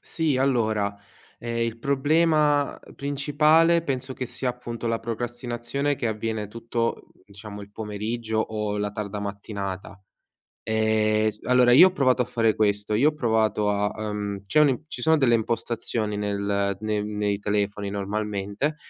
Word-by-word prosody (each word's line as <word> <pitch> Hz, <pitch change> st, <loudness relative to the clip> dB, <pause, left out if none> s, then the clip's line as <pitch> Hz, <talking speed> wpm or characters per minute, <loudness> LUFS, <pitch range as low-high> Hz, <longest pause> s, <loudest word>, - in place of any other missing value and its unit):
Sì, 160 Hz, -5 st, -1 dB
allora, 110 Hz, -6 st, +1 dB, 0.4 s
ehm, 115 Hz, 0 st, -4 dB
il 115 Hz, 0 st, -1 dB
problema 150 Hz, +2 st, +2 dB, 0.2 s
principale 150 Hz, +4 st, +3 dB
penso 130 Hz, -3 st, -3 dB
che 130 Hz, -, -4 dB
sia, 130 Hz, -, -4 dB
appunto, 120 Hz, -1 st, -6 dB
la 115 Hz, 0 st, 0 dB
procrastinazione 120 Hz, +4 st, -3 dB
che 120 Hz, -, -2 dB
avviene 110 Hz, -1 st, -3 dB
tutto, 115 Hz, +1 st, -3 dB, 0.2 s
diciamo, 105 Hz, 0 st, -10 dB
il 100 Hz, -, -12 dB
pomeriggio 110 Hz, +2 st, -3 dB
o 105 Hz, -1 st, -1 dB
la 105 Hz, 0 st, -1 dB
tarda 105 Hz, -1 st, -4 dB
mattinata. 100 Hz, -1 st, -6 dB, 0.7 s
Ehm, 110 Hz, -1 st, +2 dB
s 105 Hz, -, -11 dB
allora, 125 Hz, -1 st, +4 dB
io 180 Hz, +9 st, +9 dB
ho -, -, -1 dB
provato 130 Hz, -7 st, +2 dB
a -, -, +1 dB
fare 115 Hz, -3 st, +1 dB
questo, 105 Hz, 0 st, +1 dB
io 140 Hz, +8 st, +5 dB
ho -, -, -6 dB
provato 110 Hz, -6 st, +1 dB
a 105 Hz, 0 st, +1 dB
ehm, 105 Hz, -2 st, -3 dB
c'è 150 Hz, -, +3 dB
un 150 Hz, -, +5 dB
in 135 Hz, +3 st, -2 dB
ci -, -, -7 dB
sono 160 Hz, 0 st, +5 dB
delle 125 Hz, -5 st, +4 dB
impostazioni 115 Hz, -1 st, -2 dB
nel 100 Hz, -1 st, -1 dB
ne 105 Hz, -1 st, -1 dB
nei 105 Hz, -1 st, -1 dB
telefoni 105 Hz, 0 st, -1 dB
normalmente 100 Hz, +6 st, -2 dB
110 Hz, 150 wpm, -25 LUFS, 105-130 Hz, 0.7 s, io